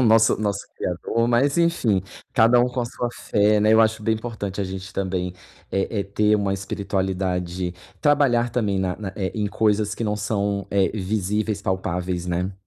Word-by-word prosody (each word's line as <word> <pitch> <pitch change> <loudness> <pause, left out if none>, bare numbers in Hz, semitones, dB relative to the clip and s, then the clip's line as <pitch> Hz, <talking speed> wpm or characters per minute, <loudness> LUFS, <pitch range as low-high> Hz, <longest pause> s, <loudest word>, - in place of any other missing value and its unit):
o - - +3
nosso 115 -1 +5
nosso 100 -1 0 0.2
criador, 105 +6 -1
mas 135 +6 +2
enfim, 150 - +2 0.3
cada 120 0 +5
um 125 - +3
com 125 0 -3
a - - 0
sua 120 +1 -3
fé, 105 -2 +2
né. 105 +1 +4
Eu 115 - +6
acho 110 0 +2
bem 110 - +2
importante 110 -3 -5
a - - 0
gente 95 0 -6
também 90 -2 -2 0.4
é 95 +2 -1
é - - +1
ter 105 +2 +2
uma 100 -1 0
espiritualidade, 95 -2 -2 0.3
trabalhar 130 -5 +3
também 105 -5 0
na 90 -1 0
na, 105 -3 -5
eh, 95 -2 -2
em 105 -2 -1
coisas 105 -1 +1
que 115 - -2
não 105 - 0
são, 100 -1 -1
eh, 100 -1 +2
visíveis, 105 +1 -1
palpáveis, 90 -2 -2
né? 90 +2 -1
105 Hz, 185 wpm, -23 LUFS, 95-110 Hz, 0.4 s, Eu